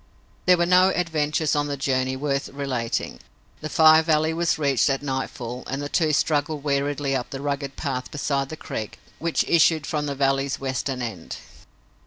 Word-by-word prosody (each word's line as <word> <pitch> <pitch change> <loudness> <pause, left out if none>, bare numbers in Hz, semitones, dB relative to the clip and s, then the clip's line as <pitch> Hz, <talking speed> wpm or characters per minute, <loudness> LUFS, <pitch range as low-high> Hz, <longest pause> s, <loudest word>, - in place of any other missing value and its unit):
There 180 -1 +6
were 175 - +2
no 185 +1 +5
adventures 160 -4 0
on 145 0 0
the 140 -1 -3
journey 130 -1 0
worth 140 +1 -2
relating. 130 -5 -3 0.4
The 155 - -5
Fire 160 -1 +6
Valley 160 0 +1
was 170 0 +1
reached 140 -3 +2
at 135 +1 -1
nightfall 130 -2 -4
and 135 - -3
the 145 0 -4
two 160 -1 +2
struggled 150 0 0
weariedly 140 -1 0
up 125 -2 -3
the 135 - -6
rugged 140 -1 -3
path 130 -4 -3
beside 140 -2 -1
the 155 - -7
creek 110 -7 -6 0.2
which 165 0 +1
issued 160 -2 +4
from 150 -1 -2
the 140 - -3
valley's 135 0 0
western 130 -1 -3
end. 110 -8 -6
145 Hz, 175 wpm, -24 LUFS, 135-155 Hz, 0.4 s, There